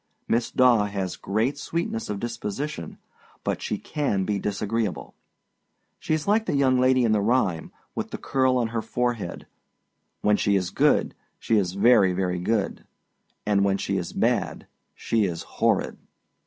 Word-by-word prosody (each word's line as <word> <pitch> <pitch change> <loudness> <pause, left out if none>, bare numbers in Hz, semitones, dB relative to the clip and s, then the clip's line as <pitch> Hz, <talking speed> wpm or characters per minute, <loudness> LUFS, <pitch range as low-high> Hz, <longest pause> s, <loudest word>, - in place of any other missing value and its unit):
Miss 115 +1 +1
Daw 120 -5 +4
has 100 -3 -3
great 115 +9 -1
sweetness 165 -8 -3
of 105 -1 -3
disposition, 115 - -5 0.5
but - - -2
she - - -2
can 120 -11 -1
be 100 0 -1
disagreeable. 105 +1 -2 0.9
She 155 - 0
is 155 +2 -4
like 220 +2 +2
the - - 0
young 130 -2 +3
lady 130 0 +4
in 115 - +2
the 105 -1 +3
rhyme, 100 -7 +1 0.2
with - - -4
the - - -5
curl 130 -1 +1
on 120 -2 0
her 115 0 -2
forehead, 120 -6 -2 0.8
âWhen 105 0 +3
she 100 - +2
is 90 -2 0
good, - - +2 0.2
She 115 - 0
is 90 -3 0
very, 100 -2 +5
very 90 -1 -1
good, 100 +2 -1 0.6
And 100 -2 +2
when 100 -1 +2
she 100 - -2
is 90 -3 -4
bad, - - 0 0.3
she 110 -2 0
is 85 -3 -3
horrid! - - 0
110 Hz, 160 wpm, -25 LUFS, 100-125 Hz, 0.9 s, very